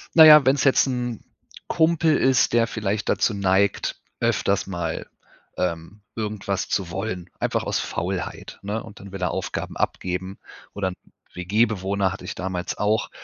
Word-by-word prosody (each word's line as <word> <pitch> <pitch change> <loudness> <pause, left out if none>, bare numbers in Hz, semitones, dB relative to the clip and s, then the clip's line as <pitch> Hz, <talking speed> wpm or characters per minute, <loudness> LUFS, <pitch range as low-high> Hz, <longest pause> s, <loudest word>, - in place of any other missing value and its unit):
Na 160 -1 +10
ja, 150 -2 +9
wenn's 135 +1 +3
jetzt 135 0 +5
'n 120 -3 -3 0.4
Kumpel 160 -1 +3
ist, 130 -2 +3
der 115 -1 +4
vielleicht 105 -2 -2
dazu 110 - +2
neigt, 100 0 +1 0.2
öfters 100 0 +1
mal, 90 -2 -4 0.5
ähm, 90 +4 -3
irgendwas 105 -3 -3
zu 90 -3 -1
wollen, 95 -1 -4
einfach - - 0
aus - - -1
Faulheit, - - -4
ne? 105 +3 -3
Und 110 -2 -12
dann 100 0 -11
will 95 - -7
er - - +1
Aufgaben - - -4
abgeben 95 +1 -2 0.4
oder 100 -2 -1
'n 90 - -8 0.4
WG 100 +6 +2
Bewohner 100 -2 -1
hatte 95 - -9
ich - - -5
damals 95 -1 -4
auch. 105 +1 +1
100 Hz, 160 wpm, -24 LUFS, 95-115 Hz, 0.5 s, Na